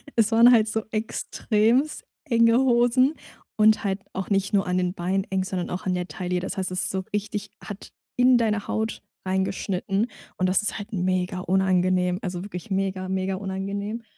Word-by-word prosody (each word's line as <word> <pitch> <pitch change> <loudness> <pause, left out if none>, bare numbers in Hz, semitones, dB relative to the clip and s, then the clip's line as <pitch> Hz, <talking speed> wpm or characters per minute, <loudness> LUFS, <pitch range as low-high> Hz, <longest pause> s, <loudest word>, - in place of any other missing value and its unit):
Es 225 -1 +3
waren 235 +2 +7
halt 220 -3 +5
so 220 0 -1
extrem 225 +4 0 0.3
enge 230 0 +5
Hosen 255 +2 +3 0.4
und 215 0 +4
halt 195 -1 -1
auch 190 +1 -4
nicht 195 0 0
nur 195 -3 +2
an 180 - 0
den 180 0 0
Beinen 190 +2 -1
eng, 190 -1 +1
sondern 185 -2 -3
auch 185 +1 -4
an 185 - +1
der 180 0 -3
Taille. 180 -1 -3
Das 190 +3 -5
heißt, 190 -1 -1
es 185 0 -1
ist - - 0
so 190 0 -2
richtig 210 0 -3
hat 205 -2 -8 0.3
in 250 0 +5
deine 215 -3 0
Haut 220 0 -2 0.2
reingeschnitten 190 +2 -1 0.3
und 185 - +1
das 185 +2 +3
ist 210 - -2
halt 215 +2 -8
mega 185 0 0
unangenehm, 185 -1 +2
also 180 -2 -4
wirklich 180 -3 -7
mega, 190 -1 -1
mega 190 0 -1
unangenehm. 200 +3 -4
195 Hz, 180 wpm, -25 LUFS, 185-220 Hz, 0.4 s, waren